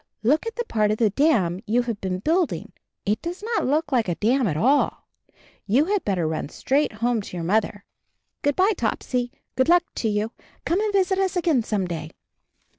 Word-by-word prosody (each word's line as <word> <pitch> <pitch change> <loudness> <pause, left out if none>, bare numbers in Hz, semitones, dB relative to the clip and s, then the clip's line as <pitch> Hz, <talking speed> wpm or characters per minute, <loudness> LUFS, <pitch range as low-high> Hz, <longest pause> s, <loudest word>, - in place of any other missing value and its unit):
Look 295 - +2
at 455 - -4
the 475 - -2
part 215 - +1
of 215 - +1
the 220 -3 +2
dam 205 - +2
you 240 +4 +2
have 230 -4 -4
been 185 -1 -2
building 325 - 0 0.2
— - - -59
it 210 +2 0
does 350 +4 -6
not 450 - 0
look 295 +2 0
like 240 -5 +2
a 175 - 0
dam 245 +5 +2
at 155 -4 -1
all! 270 - +2 0.6
You 250 +9 +3
had 405 +1 0
better 180 -5 0
run 155 -2 -3
straight 280 - 0
home 230 +1 0
to 180 - -8
your 170 - -3
mother. 205 +2 0 0.6
Good 285 -1 +1
by, 385 +3 +4
Topsy, 245 0 -1
24 - - -28
CHARLIE 290 - -40
good 260 +4 +2
luck 350 0 +6
to 225 - 0
you. 210 +2 -1 0.3
Come 360 +5 +1
and 430 -1 0
visit 385 -1 +2
us 380 -1 0
again 335 -8 +2
some 210 -4 -1
day." 160 -3 -5
245 Hz, 215 wpm, -24 LUFS, 210-330 Hz, 0.6 s, luck